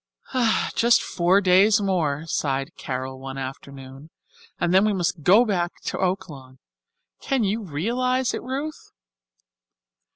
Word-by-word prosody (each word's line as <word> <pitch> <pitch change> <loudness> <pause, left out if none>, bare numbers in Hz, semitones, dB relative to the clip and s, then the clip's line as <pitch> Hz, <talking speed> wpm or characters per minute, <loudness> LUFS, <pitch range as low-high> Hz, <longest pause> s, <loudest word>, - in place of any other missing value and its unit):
"Just 235 0 +3
four 180 +3 +2
days 195 +3 +5
more," 165 -7 -1
sighed 135 -3 -2
Carol 130 0 -5
one 135 0 -7
afternoon, 135 +1 -9 0.5
"and 175 0 0
then 190 +1 +5
we 215 -1 +2
must 175 -3 -1
go 205 +11 +5
back 180 -5 -1
to - - -3
Oaklawn. 150 -9 -4 0.6
Can 270 -4 0
you 210 +3 -1
realize 240 - -1
it, - - -4
Ruth?" 280 +5 -5
180 Hz, 125 wpm, -23 LUFS, 140-215 Hz, 0.6 s, days